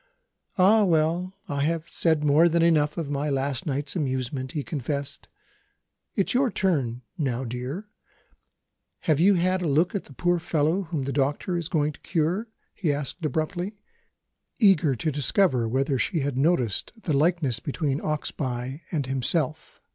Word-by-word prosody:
"Ah, 205 +4 +6
well 175 +1 +1
I 140 -1 -2
have 165 +2 -1
said 160 -3 +2
more 150 +4 +5
than 170 0 +2
enough 155 -2 +3
of 155 -4 -3
my 145 +1 -1
last 135 -1 -1
night's 145 +2 -2
amusement," 130 -3 -2
he 150 - -2
confessed. 140 -1 -3 0.9
"It's 195 - +1
your 255 +1 +3
turn 135 - 0 0.2
now, 130 -4 -1
my - - -5
dear. 130 - -5 1.1
Have 155 -3 +2
you 195 +4 +5
had 185 +1 +1
a 175 - -1
look 155 +5 +2
at 200 - -3
the 140 - -14
poor 175 +5 +1
fellow 160 +3 +1
whom 160 -4 -3
the 135 +1 -3
doctor 145 +6 0
is 170 -1 -2
going 150 -4 +1
to - - -16
cure?" 175 +6 -1 0.3
he 170 -8 0
asked 145 +4 -4
abruptly; 170 - -2 0.8
eager 185 - +4
to 155 +6 -1
discover 140 - +2
whether 135 +3 0
she 155 +7 0
had 140 -1 -2
noticed 130 - +1
the 155 - 0
likeness 145 -5 +2
between 145 0 -2
Oxbye 135 -2 -3
and 150 -5 -1
himself. 135 +4 -1
150 Hz, 160 wpm, -26 LUFS, 135-175 Hz, 1.1 s, Ah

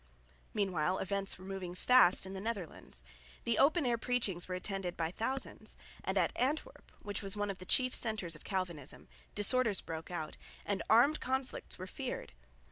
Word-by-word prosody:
Meanwhile 185 -4 +1
events 195 0 -1
were 185 - -12
moving 190 -2 -5
fast 220 -3 +6
in 190 - -6
the 190 - -5
Netherlands. 170 - -4 0.4
The 230 -2 +1
open 305 +2 +4
air 235 -2 +1
preachings 225 -8 0
were 185 - -2
attended 185 -1 -3
by 165 0 -1
thousands; 260 +7 -3 0.3
and - - -1
at - - +2
Antwerp, 305 - -1
which 205 0 -2
was 195 0 -1
one 205 -1 0
of 195 - -9
the 185 - -9
chief 255 -1 +5
centres 215 -8 +2
of 155 - -13
Calvinism, 180 -8 -3 0.3
disorders 215 -1 +4
broke 160 0 -6
out, 165 -3 -4 0.3
and 200 -1 -1
armed 260 +8 +6
conflicts 265 0 -2
were 185 - -6
feared. 245 - -5
195 Hz, 170 wpm, -34 LUFS, 180-245 Hz, 0.4 s, fast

